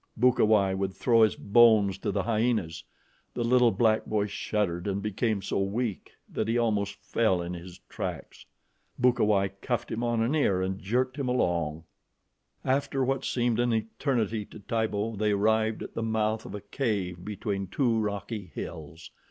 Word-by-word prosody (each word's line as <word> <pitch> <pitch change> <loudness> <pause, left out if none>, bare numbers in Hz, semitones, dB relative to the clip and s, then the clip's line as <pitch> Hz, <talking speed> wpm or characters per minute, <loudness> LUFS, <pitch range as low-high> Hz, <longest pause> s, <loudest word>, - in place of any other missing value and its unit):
Bukawai 110 -5 +4
would 95 0 -2
throw 115 -2 +3
his 110 -2 +4
bones 105 -3 +4
to - - -2
the 100 - -1
hyenas. 110 -8 0 0.5
The 120 - -1
little 125 0 +5
black 110 +1 +2
boy 105 -1 +1
shuddered 100 -3 -2
and 100 0 -1
became 105 0 -1
so 100 - -1
weak 100 +2 -2 0.2
that 110 - -3
he 115 +1 +1
almost 105 -4 0
fell 110 -6 +1
in 85 +1 -4
his 90 0 -9
tracks. - - -6 0.5
Bukawai 105 -6 +3
cuffed 120 -2 -2
him 115 - -2
on 120 -1 +1
an 120 +6 0
ear 120 -12 +2
and 95 +1 -2
jerked 125 +6 -1
him 135 -3 -2
along. 85 -9 0 0.8
After 135 0 +1
what 135 0 -1
seemed 120 -2 0
an 120 0 +2
eternity 110 -1 -1
to 110 - -12
Tibo, 110 0 -1
they 105 0 +1
arrived 110 +2 +1
at - - -9
the - - -3
mouth 110 0 -1
of - - -7
a 105 - -6
cave 100 -6 -2
between 100 -2 -3
two 115 +3 +1
rocky 105 -2 -4
hills. 80 +1 -8
110 Hz, 165 wpm, -28 LUFS, 100-120 Hz, 0.8 s, little